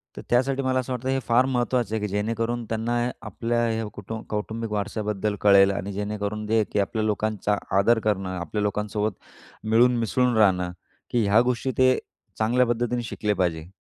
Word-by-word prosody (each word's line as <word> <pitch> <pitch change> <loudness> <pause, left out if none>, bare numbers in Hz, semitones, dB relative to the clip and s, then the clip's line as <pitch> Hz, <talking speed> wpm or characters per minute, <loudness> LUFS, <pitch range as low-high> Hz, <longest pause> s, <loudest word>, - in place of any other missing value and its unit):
तर - - -7
त्यासाठी 130 +3 +2
मला 130 0 +1
असं 130 0 -3
वाटतंय 130 +2 -2
हे 135 - +1
फार 120 +2 +4
महत्त्वाचं 120 -3 0
आहे, - - 0
की - - -1
जेणेकरून 115 +4 -2
त्यांना 115 +2 -2 0.3
आपल्या 120 0 -1
ह्या 115 0 -1
कुटुंब 110 +2 -7
कौटुंबिक 110 +1 -3
वारसाबद्दल 105 0 -2
कळेल 100 -1 +6
आणि 100 +1 -4
जेणेकरून 105 +1 -3
जे 110 0 +3
की 105 - 0
आपल्या 110 +2 -1
लोकांचा 105 -1 0 0.2
आदर 115 +4 +4
करणं, 95 -4 -1
आपल्या 85 +5 -3
लोकांसोबत 105 +1 -1 0.5
मिळून 120 +3 +4
मिसळून 120 +2 +1
राहणं, 90 -4 +3 0.4
की 120 -2 +1
ह्या 105 +3 +5
गोष्टी 125 +1 0
ते 130 0 +5 0.4
चांगल्या 120 +3 +3
पद्धतीने 120 +1 0
शिकले 105 -2 -2
पाहिजे. 85 -4 -1
110 Hz, 170 wpm, -25 LUFS, 105-120 Hz, 0.5 s, कळेल